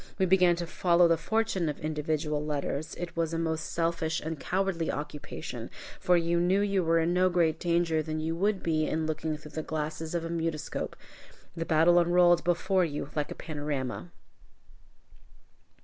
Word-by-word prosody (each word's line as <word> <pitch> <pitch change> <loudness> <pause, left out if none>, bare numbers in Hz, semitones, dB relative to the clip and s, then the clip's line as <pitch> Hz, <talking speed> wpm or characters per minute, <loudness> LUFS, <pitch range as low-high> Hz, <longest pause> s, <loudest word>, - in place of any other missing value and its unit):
We 190 - +3
began 180 -1 +4
to 170 0 -4
follow 175 0 +3
the 165 - +4
fortunes 190 -1 0
of 150 - -5
individual 150 0 -2
letters. 150 +1 -3
It 175 -1 -6
was 165 -1 -1
a - - -1
most 160 -1 -1
selfish 165 -1 0
and 160 -1 -5
cowardly 185 0 -1
occupation, 150 0 -6 0.3
for 180 -1 +3
you 170 0 +1
knew 180 +3 +3
you 200 -2 +1
were 165 0 +3
in 165 +1 +2
no 185 +1 +4
greater 165 -3 +2
danger 170 -2 +1
than 155 0 -3
you 160 +1 -2
would 195 +2 0
be 155 -2 +1
in 160 0 -1
looking 155 0 -2
through 150 0 -12
the 155 - -3
glasses 155 +1 -4
of 165 -1 -1
a - - -4
mutoscope. 165 -2 -3 0.6
The 165 - -3
battle 165 +2 +5
unrolled 175 0 +4
before 180 +2 +2
you 145 -3 -3
like 150 -1 -1
a - - -6
panorama. 145 +1 -4
165 Hz, 175 wpm, -29 LUFS, 155-175 Hz, 0.6 s, battle